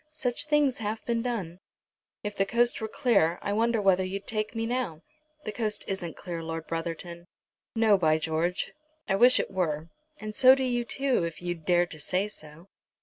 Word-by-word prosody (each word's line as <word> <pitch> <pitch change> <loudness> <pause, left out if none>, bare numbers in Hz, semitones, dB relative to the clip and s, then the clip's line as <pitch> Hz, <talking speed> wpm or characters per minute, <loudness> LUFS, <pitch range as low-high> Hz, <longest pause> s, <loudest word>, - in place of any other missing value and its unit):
Such 250 -3 -2
things 295 -4 +2
have 220 0 -3
been 235 -1 0
done." 200 -8 -3 0.6
"If 205 -1 -4
the 195 - +2
coast 235 +2 +2
were 220 - -2
clear 200 -8 +2
I 205 - -1
wonder 230 +1 +2
whether 190 -2 +3
you'd 195 +2 -4
take 215 +1 -3
me 225 0 -1
now." 230 -10 -2 0.4
"The 215 - -2
coast 210 -1 -2
isn't 185 -4 -4
clear, 170 -2 -5
Lord 165 0 -5
Brotherton." 170 +1 -5 0.5
"No, 220 -3 +4
by 155 -2 +3
George. 160 +3 -1 0.3
I - - +1
wish 245 +5 +6
it - - -2
were, 165 -4 -1 0.3
and 215 0 -6
so 255 +4 +7
do 265 - -1
you 245 -2 0
too, 270 -4 +1
if 165 -2 -4
you'd 175 -3 -5
dare 175 -1 +4
to 160 -3 -5
say 185 +7 0
so." 155 -4 -12
195 Hz, 190 wpm, -28 LUFS, 170-235 Hz, 0.6 s, so